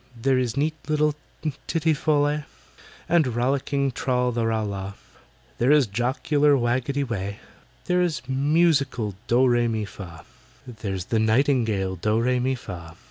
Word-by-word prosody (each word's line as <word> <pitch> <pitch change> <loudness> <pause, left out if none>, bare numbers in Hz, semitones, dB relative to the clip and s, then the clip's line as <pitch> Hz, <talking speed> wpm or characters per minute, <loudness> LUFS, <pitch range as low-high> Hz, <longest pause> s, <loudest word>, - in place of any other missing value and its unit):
"There 130 +2 +2
is 125 0 -2
neat 155 +3 +1
little 150 -1 +2 0.5
TITTY 160 -1 +1
FOL 150 0 +1
LEH, 150 +1 0 0.7
There 170 +1 +4
is 155 - +2
rollicking 135 +3 0
TRAL 125 0 0
THE 115 -1 -1
RAL 110 -1 0
LAH, 100 -1 -5 0.7
There 125 +4 +3
is 150 -3 +5
jocular 140 +6 +1
WAGGETY 130 +3 0
WEH, 100 -5 -3 0.5
There 180 0 +2
is 155 -9 -1
musical 140 - +1
DOH 125 +3 +4
REH 120 -1 +3
MI 110 -2 -1
FAH— 85 -4 -10 0.4
There's 105 -7 -5
the 110 +2 0
nightingale 110 -5 +1
DOH 105 +5 +1
REH 125 +2 +1
MI 130 +2 0
FAH!" 85 -8 -9
125 Hz, 150 wpm, -24 LUFS, 110-145 Hz, 0.7 s, is